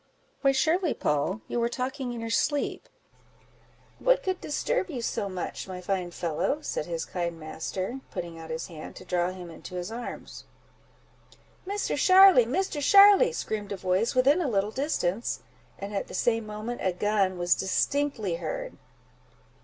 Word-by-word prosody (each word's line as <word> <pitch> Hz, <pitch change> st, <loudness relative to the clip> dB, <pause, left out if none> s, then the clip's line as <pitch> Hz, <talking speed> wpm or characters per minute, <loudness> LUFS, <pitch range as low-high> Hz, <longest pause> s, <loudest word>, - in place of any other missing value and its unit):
"Why 275 Hz, -, +5 dB
surely, 325 Hz, +5 st, +1 dB
Poll, 150 Hz, +8 st, 0 dB
you 240 Hz, -, -2 dB
were 235 Hz, 0 st, +1 dB
talking 260 Hz, +1 st, -3 dB
in 235 Hz, -1 st, -5 dB
your 230 Hz, 0 st, -4 dB
sleep; 290 Hz, +5 st, 0 dB, 1.1 s
what -, -, +3 dB
could 375 Hz, -1 st, -2 dB
disturb 370 Hz, +6 st, -1 dB
you 275 Hz, -7 st, -4 dB
so 210 Hz, -3 st, -2 dB
much, 185 Hz, 0 st, -5 dB
my 185 Hz, -1 st, -6 dB
fine 180 Hz, -1 st, -2 dB
fellow?" 175 Hz, -, -2 dB
said 150 Hz, -, -3 dB
his 165 Hz, -2 st, -3 dB
kind 170 Hz, -2 st, -3 dB
master, 185 Hz, +9 st, -4 dB
putting 170 Hz, -1 st, -6 dB
out 160 Hz, 0 st, -9 dB
his 160 Hz, +1 st, -3 dB
hand 160 Hz, -3 st, -9 dB
to 185 Hz, -, -11 dB
draw 175 Hz, 0 st, 0 dB
him 180 Hz, -2 st, -8 dB
into 175 Hz, +2 st, -10 dB
his 180 Hz, +3 st, -4 dB
arms. 235 Hz, +1 st, -7 dB, 1.2 s
"Misser 405 Hz, +1 st, -1 dB
Sharly! 370 Hz, -10 st, +7 dB
Misser 305 Hz, +2 st, -1 dB
Sharly!" 405 Hz, -, +7 dB
screamed 210 Hz, -, -4 dB
a 200 Hz, -, -3 dB
voice 185 Hz, +6 st, 0 dB
within 275 Hz, +7 st, +4 dB
a 325 Hz, -, 0 dB
little 205 Hz, -1 st, 0 dB
distance, 230 Hz, -, -1 dB, 0.4 s
and 200 Hz, +1 st, -6 dB
at 195 Hz, -, -2 dB
the -, -, -8 dB
same 225 Hz, +2 st, +1 dB
moment 215 Hz, +3 st, -5 dB
a 185 Hz, -, +1 dB
gun 195 Hz, -1 st, +1 dB
was 175 Hz, 0 st, +3 dB
distinctly 215 Hz, -2 st, 0 dB
heard. -, -, -5 dB
215 Hz, 160 wpm, -27 LUFS, 180-285 Hz, 1.2 s, Sharly